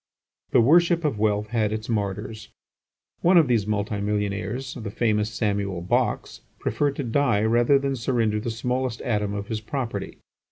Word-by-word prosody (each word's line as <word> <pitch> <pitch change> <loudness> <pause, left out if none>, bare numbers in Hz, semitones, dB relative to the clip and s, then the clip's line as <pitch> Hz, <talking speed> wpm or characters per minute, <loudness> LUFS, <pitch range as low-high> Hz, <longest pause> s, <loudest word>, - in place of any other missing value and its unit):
The 120 - +5
worship 170 +5 +4
of 135 -8 0
wealth 105 0 +1
had 110 -3 0
its 110 0 -4
martyrs. 105 0 -3 0.7
One 180 +1 +5
of 160 -4 +6
these 115 -5 +1
multi 105 -1 -1
millionaires, 105 +4 -2
the 115 -5 -6
famous 105 -1 0
Samuel 100 -5 -1
Box, 90 - -1 0.2
preferred 140 +5 -1
to 140 - -3
die 120 -3 +1
rather 120 +5 +4
than 135 0 -1
surrender 115 -3 0
the 115 - -4
smallest 125 +1 -2
atom 105 -3 -1
of 100 0 -4
his 110 -1 -3
property. 125 +1 -4
110 Hz, 160 wpm, -24 LUFS, 105-125 Hz, 0.7 s, of